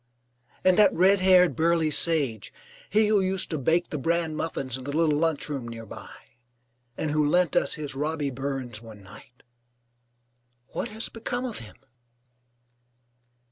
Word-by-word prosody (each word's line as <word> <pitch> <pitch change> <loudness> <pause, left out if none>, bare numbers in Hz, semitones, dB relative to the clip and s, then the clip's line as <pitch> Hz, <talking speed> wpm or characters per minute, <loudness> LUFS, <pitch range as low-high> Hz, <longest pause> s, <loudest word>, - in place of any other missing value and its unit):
And 185 +1 +4
that 210 - +7
red 190 +3 +4
haired 180 -5 +5
burly 165 +1 +2
sage, 145 -8 +1 0.4
he 215 0 +3
who 210 -1 +3
used 190 -1 -1
to 155 - -2
bake 165 +6 +1
the 150 - -3
bran 165 +2 0
muffins 140 -6 -3
in 130 - -5
the 140 - -4
little 160 -3 +3
lunchroom 150 -5 -1
near 115 -1 -8
by, - - -10 0.9
and 155 - -2
who 150 0 +2
lent 175 +2 +2
us - - +2
his 150 -3 -6
Robby 150 0 -2
Burns 130 -4 -5
one 110 -3 -13
night 120 +6 -16 1.3
what 240 - -4
has 220 +2 -4
become 245 +2 -4
of 240 -4 -4
him? 110 -2 -12
155 Hz, 150 wpm, -26 LUFS, 135-180 Hz, 1.3 s, that